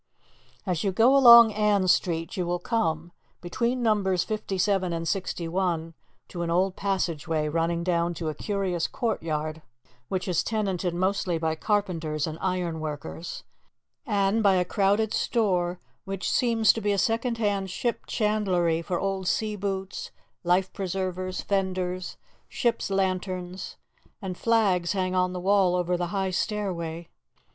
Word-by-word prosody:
As 180 -4 -1
you 195 - +1
go 230 +8 +4
along 235 -4 +9
Ann 205 -2 +2
Street, 165 -1 +1
you 185 - -1
will 175 0 0
come, 170 -4 -1 0.3
between 235 +8 -1
numbers 195 -5 +2
57 195 -3 -1
and 165 0 -3
61, 170 -2 -2 0.4
to 175 - -5
an 170 - -2
old 185 +2 +1
passage 180 -6 -2
way 155 -2 0
running 165 +2 0
down 170 -1 0
to 165 0 -4
a 155 - -1
curious 190 -3 -2
courtyard, 160 - -2 0.5
which 185 +5 -3
is 175 -3 +1
tenanted 190 -5 -1
mostly 185 -1 0
by 160 -1 0
carpenters 165 -5 -1
and 160 0 -6
iron 180 -3 -1
workers, 155 +2 -6 0.6
and 205 -2 +1
by 200 -3 +4
a 180 -1 +2
crowded 205 +3 +1
store 180 -6 0 0.3
which 195 -1 -3
seems 230 -3 +3
to 225 - -4
be 205 0 +1
a 200 - +1
second 230 +3 0
hand 200 -3 0
ship 235 +6 -3
chandlery, 185 -7 +1
for 175 +1 -2
old 195 -1 -2
sea 215 +1 0
boots, 195 -1 -4 0.3
life 185 +2 +1
preservers, 185 -1 -3
fenders, 185 -2 -2 0.3
ship's 235 -5 -1
lanterns, 185 -1 -2 0.4
and 190 -3 -5
flags 200 -6 +2
hang 185 -2 -1
on 180 0 +1
the 180 - -4
wall 190 -1 +3
over 180 0 0
the 175 0 -2
high 190 +1 -1
stairway. 175 -5 -3
185 Hz, 145 wpm, -26 LUFS, 175-205 Hz, 0.6 s, along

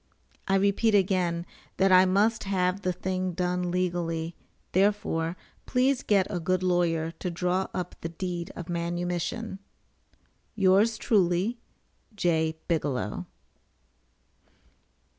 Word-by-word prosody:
[I 195 - +3
repeat 200 +3 +3
again 180 -3 +1 0.3
that 195 0 +4
I 185 0 +8
must 205 +4 +2
have 185 0 0
the 185 - 0
thing 185 0 -2
done 180 0 -1
legally, 175 -2 -1 0.4
therefore, 185 -4 +1 0.3
please 255 +1 +2
get 200 -3 +3
a 180 - -1
good 185 +2 0
lawyer 170 -3 +1
to 180 - -2
draw 180 +2 0
up 180 -1 -4
the 165 - -3
deed 175 0 -4
of 175 - -7
manumission.] 175 +5 -3 1.0
Yours 200 +3 +4
Truly, 200 +2 +1 0.6
J. 160 -4 +1
BIGELOW. 135 - -1
180 Hz, 110 wpm, -27 LUFS, 170-195 Hz, 1.0 s, I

